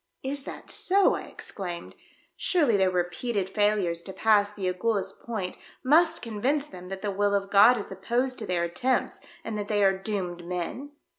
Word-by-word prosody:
"Is 275 +1 -1
that - - -7
so?" 390 +1 +4
I - - -4
exclaimed. 175 -3 -6 0.4
"Surely 300 - +2
their 190 -1 +3
repeated 185 +3 -1
failures 200 -4 +1
to 190 - -9
pass 205 0 +3
the 205 -2 -5
Agulhas 195 +1 -1
point 210 -6 -5 0.2
must 320 +5 +4
convince 250 +6 0
them 180 -8 -11
that 195 +1 -6
the 205 - -1
will 200 +1 +1
of 195 0 -2
God 210 +5 +7
is 205 - -6
opposed 245 +7 -1
to 215 - -5
their 175 -2 0
attempts 210 +10 -1 0.2
and 215 -2 -4
that 205 - -4
they 205 -1 +2
are 195 0 +4
doomed 190 -3 -4
men." 180 - -5
205 Hz, 175 wpm, -27 LUFS, 185-235 Hz, 0.4 s, God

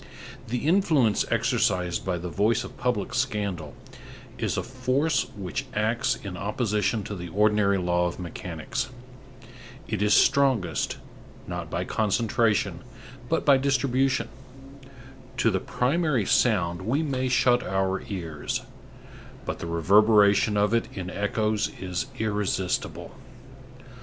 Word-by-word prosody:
The 125 +4 -3
influence 155 - +3
exercised 90 -2 +1
by 90 -2 -1
the 85 +1 -5
voice 105 +5 +1
of - - -10
public 125 -3 -2
scandal 105 - -2 0.6
is - - -1
a - - -1
force 130 +4 0
which 100 +7 -4
acts 110 +3 +1
in 95 -3 -7
opposition 105 +2 -1
to 105 - -6
the 90 -1 -6
ordinary 105 +1 +2
law 90 -1 +1
of 85 - -5
mechanics. 90 +6 -5 1.0
It 110 -3 -2
is 105 0 +4
strongest, 130 - +2 0.5
not - - -5
by - - -2
concentration, 110 +1 +1 0.5
but - - 0
by 140 -2 +6
distribution. 135 -1 +1 1.1
To - - +3
the - - 0
primary 140 - 0
sound 90 -8 +2
we 130 +11 0
may 130 -3 -1
shut 125 -1 +3
our 95 0 -1
ears; 85 -7 -4 0.8
but - - -4
the - - -5
reverberation 105 +4 +4
of 105 +1 +2
it 115 - +1
in 90 -1 -5
echoes 105 +1 0
is 90 -2 -3
irresistible. 105 -4 -2
105 Hz, 120 wpm, -26 LUFS, 95-125 Hz, 1.1 s, by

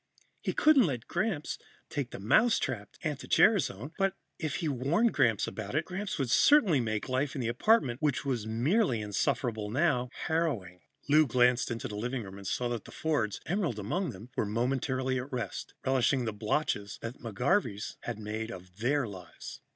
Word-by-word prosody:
He - - -1
couldn't 285 - +5
let 125 -5 -3
Gramps 175 -4 -2 0.3
take 140 -5 -3
the - - -7
mousetrapped 120 - +2
anti 150 -4 -3
gerasone 160 - +3
but, 195 0 +2 0.2
if 155 -3 -2
he 165 - -2
warned 150 - +2
Gramps 115 -7 +3
about 110 +3 -5
it, 155 +2 +1
Gramps 190 +3 -4
would 135 -5 -1
certainly 220 - +5
make 110 -3 -2
life 130 +3 -1
in 135 - -2
the 115 - -1
apartment, 125 - +2
which 145 -2 0
was 120 -6 -1
merely 125 - +2
insufferable 105 +1 -1
now, 125 -1 +1 0.2
harrowing. 120 - -1 0.3
Lou 155 +1 +5
glanced 125 +1 +3
into 115 -1 -3
the 105 - -6
living 120 +3 -2
room 95 0 -9
and 100 - -7
saw 125 - 0
that 120 -3 -4
the - - -11
Fords, 120 -11 -1
Emerald 175 - -1
among 165 - -1
them, 110 +2 -10
were - - +1
momentarily 130 +3 0
at 130 +3 -7
rest, 125 -2 -4
relishing 130 -1 +2
the 110 - -2
botches 105 -1 -1
that 115 +2 -6
the 115 - -5
McGarveys 125 - 0
had 120 -3 -5
made 110 +1 -4
of 90 -4 -10
their 135 +2 +1
lives. 95 -4 -10
125 Hz, 180 wpm, -30 LUFS, 110-155 Hz, 0.3 s, couldn't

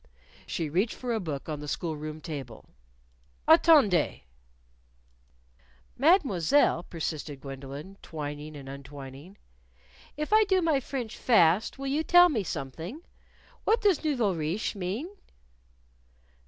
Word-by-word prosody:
She 165 - -2
reached 185 +9 0
for 245 -2 -3
a 225 - 0
book 155 -8 -5
on 155 -2 -4
the 150 - -7
school 160 +2 -3
room 155 +1 -7
table. 140 -9 -7 0.8
"Attendez!" 305 - +5 1.7
"Mademoiselle," 280 - +3
persisted 155 -4 -5
Gwendolyn, 140 +7 -9
twining 150 -1 -6
and 135 -1 -10
untwining, 140 +4 -10 0.8
"if 300 +7 -2
I 435 0 +7
do 380 -1 +3
my 320 -5 +2
French 245 -4 -5
fast 190 -2 +3
will 275 - -6
you 280 +3 0
tell 355 +2 +7
me 230 -10 -1
something? 165 - -6 0.6
What 450 +2 +3
does 395 -8 +2
nouveaux 245 -10 +1
riches 165 +6 -2
mean?" 200 - -3
180 Hz, 120 wpm, -28 LUFS, -, 1.7 s, I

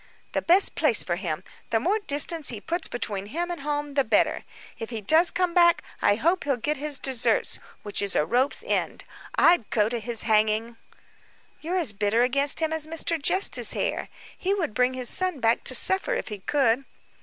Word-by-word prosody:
"The - - -2
best 365 +4 +4
place 275 -9 +2
for 175 -1 -3
him; 175 -2 -4 0.3
the 225 -2 +1
more 390 - 0
distance 310 -3 0
he 230 - -4
puts 335 - -3
between 205 -5 -4
him 345 +9 -4
and 345 - -6
home, 290 0 -4
the 275 -1 +2
better. 220 -4 0 0.3
If 225 - -6
he 230 -3 -5
does 315 - +4
come 360 -2 -1
back, 345 -1 +4 0.2
I 205 - +3
hope 335 - 0
he'll 275 -3 -1
get 295 +5 -2
his 290 0 -1
desserts 260 -3 0 0.2
which 205 - +1
is 200 -2 -1
a 150 - +2
rope's 250 - 0
end. - - -2 0.3
I'd 335 -10 +3
go 210 -1 +1
to 240 0 -3
his 230 0 -2
hanging." 220 +1 0 0.8
"You 330 +3 -5
are - - +1
as 305 - +2
bitter 205 +4 +1
against 275 +5 +2
him 320 0 -1
as 315 -1 -3
Mr. 325 0 -1
Justice 365 +6 +3
Hare. - - -3 0.3
He 390 +2 -1
would 335 - -3
bring 250 +2 +1
his 255 -1 -2
son 370 -5 +1
back 230 -1 +1
to 255 - +2
suffer, 385 - +3
if - - -5
he 210 -2 -7
could." 265 +3 0
275 Hz, 200 wpm, -25 LUFS, 225-330 Hz, 0.8 s, best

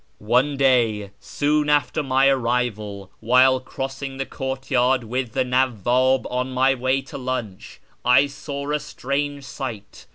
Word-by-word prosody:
One 125 +6 +1
day, 115 -7 +2
soon 150 0 0
after 150 +1 +2
my 135 -1 +3
arrival, 115 -6 -1
while 130 +3 +4
crossing 135 +1 -6
the 135 - -2
courtyard 130 -2 0
with 120 0 -3
the - - +1
Nawwab 130 +1 +2
on 125 +1 -2
my 130 +1 +3
way 130 +1 0
to 135 - -9
lunch, 125 -7 -5 0.2
I 125 +3 +5
saw 140 0 -6
a 150 - +1
strange 140 +1 -3
sight. 110 - -8
130 Hz, 135 wpm, -22 LUFS, 120-135 Hz, 0.2 s, I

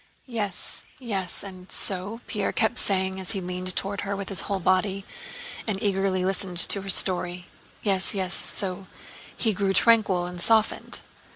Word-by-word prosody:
"Yes, 210 -7 -5
yes, 200 -8 -4
and 185 -2 -10
so...?" 200 +4 -1
Pierre 210 -4 -1
kept 220 -1 +1
saying 190 -1 0
as 190 +3 -1
he 195 - -2
leaned 180 0 -3
toward 200 +1 -2
her 200 0 -2
with 195 -1 -5
his 195 - +3
whole 200 - -1
body 190 +2 +1 0.6
and 200 -3 -1
eagerly 195 -3 +1
listened 190 -1 -1
to 195 +3 +4
her 195 - -7
story. 180 -2 +3 0.4
"Yes, 195 -1 +2
yes... 190 -1 -1
so 190 -1 -2 0.5
he 220 -3 +2
grew 195 0 +1
tranquil 200 -4 +4
and 180 0 -5
softened? 220 +1 +2
195 Hz, 160 wpm, -26 LUFS, 185-205 Hz, 0.6 s, to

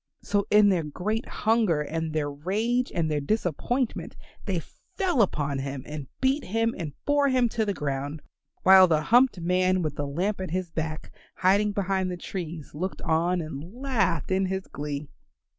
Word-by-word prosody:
So 205 0 0
in 210 0 +6
their 185 -4 +2
great 195 - -3
hunger 215 -8 +2
and 160 +2 -3
their 150 -2 -1
rage 215 - -1
and 160 -3 0
their 150 -1 0
disappointment 220 - -1 0.3
they - - 0 0.4
fell 360 - +2
upon 145 -8 0
him 135 -1 -4
and 150 -2 -6
beat 270 +2 +2
him 225 +4 0
and 155 -5 -5
bore 290 -1 +3
him 255 -2 +3
to 220 -1 0
the 200 - +1
ground, 145 +1 -3 0.4
while 190 0 +8
the 155 -3 +2
humped 245 +1 +4
man 185 +1 +2
with 150 -2 -3
the 145 - -2
lamp 185 +8 -1
at 185 - -4
his 180 0 -3
back 160 -1 -4 0.2
hiding 200 +3 +3
behind 195 -2 0
the 180 - -4
trees 170 -4 -6
looked 185 +6 -4
on 170 +2 +1
and 160 +5 -7
laughed 220 - 0
in 190 0 +2
his 190 0 -3
glee. 145 0 -5
185 Hz, 175 wpm, -26 LUFS, 155-210 Hz, 0.4 s, while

